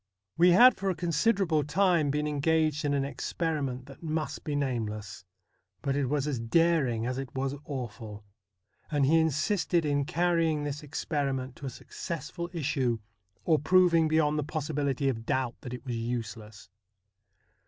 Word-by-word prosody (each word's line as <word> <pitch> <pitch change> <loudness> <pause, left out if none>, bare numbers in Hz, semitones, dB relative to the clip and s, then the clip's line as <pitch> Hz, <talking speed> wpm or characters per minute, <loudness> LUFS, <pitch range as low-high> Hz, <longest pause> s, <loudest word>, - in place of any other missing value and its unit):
We 175 +2 +5
had 250 +7 +8
for 195 0 -2
a 185 - 0
considerable 170 0 +1
time 170 -1 +2
been 150 +2 0
engaged 155 +1 +1
in 145 -1 +1
an 135 -1 0
ex 140 - -5
periment 140 -7 -2
that 135 -1 -13
must 155 -1 -3
be 150 - -3
nameless; 110 -8 -3 0.6
but 135 -1 0
it 140 -2 0
was 145 -1 0
as 145 -5 -2
daring 130 -3 +2
as 125 +1 -2
it 135 -2 -5
was 135 +1 -1
awful, 115 -6 -6 0.7
and 145 -3 +2
he 160 +4 +4
insisted 160 +2 +1
in 145 -1 +1
carrying 165 -2 +1
this 145 0 -4
experiment 135 -3 -3
to 140 - -6
a - - -2
successful 170 +6 -6
issue, 140 -7 0 0.5
or 160 -3 +4
proving 170 0 +4
beyond 155 -1 +2
the - - 0
possibility 145 -2 -1
of 115 -4 -1
doubt 130 -2 0
that 125 - -7
it 125 +2 -7
was 125 -2 -3
useless. 110 -3 -5
145 Hz, 160 wpm, -29 LUFS, 130-160 Hz, 0.7 s, had